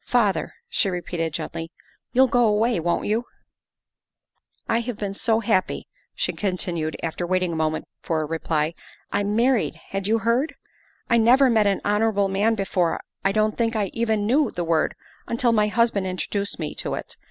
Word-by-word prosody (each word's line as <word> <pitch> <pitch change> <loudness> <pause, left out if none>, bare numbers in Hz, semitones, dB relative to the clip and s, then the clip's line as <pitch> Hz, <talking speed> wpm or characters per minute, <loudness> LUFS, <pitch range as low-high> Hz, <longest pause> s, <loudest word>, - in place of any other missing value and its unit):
" - - -38
Father," 205 -5 +1
she 360 - +1
repeated 175 -2 -3
gently, 165 +2 -5 0.2
" - - -39
you'll 260 +2 +5
go 245 -1 +3
away, 220 +2 +2
won 170 +1 0
't - - -6
you? 225 +3 0 0.7
" - - -46
I 230 - +2
have 235 -2 -4
been 200 -2 -3
so 225 +2 +1
happy," 210 -5 0 0.3
she - - -1
continued, 175 -5 -2
after 170 +1 -2
waiting 185 -1 +1
a - - -3
moment 155 0 -1 0.2
for 160 -2 -1
a - - -1
reply. 160 0 -1 0.4
"I'm 205 +1 0
married, 245 +1 +2
had 195 0 -3
you 225 +2 +3
heard? 235 +7 +1 0.5
I 235 - +4
never 250 +3 +5
met 215 -2 +4
an 195 - +1
honorable 210 -1 +2
man 205 +4 +2
before 190 -4 0 0.2
I 195 - +3
don't 215 +1 +1
think 230 0 +1
I 205 -4 0
even 220 -3 0
knew 270 +4 +3
the 175 - -3
word 165 -2 +1 0.3
until 235 +1 +2
my 210 -2 +3
husband 210 -3 +1
introduced 200 +2 -2
me 155 -3 -4
to - - -3
it. - - -7
205 Hz, 185 wpm, -24 LUFS, 180-230 Hz, 0.7 s, you'll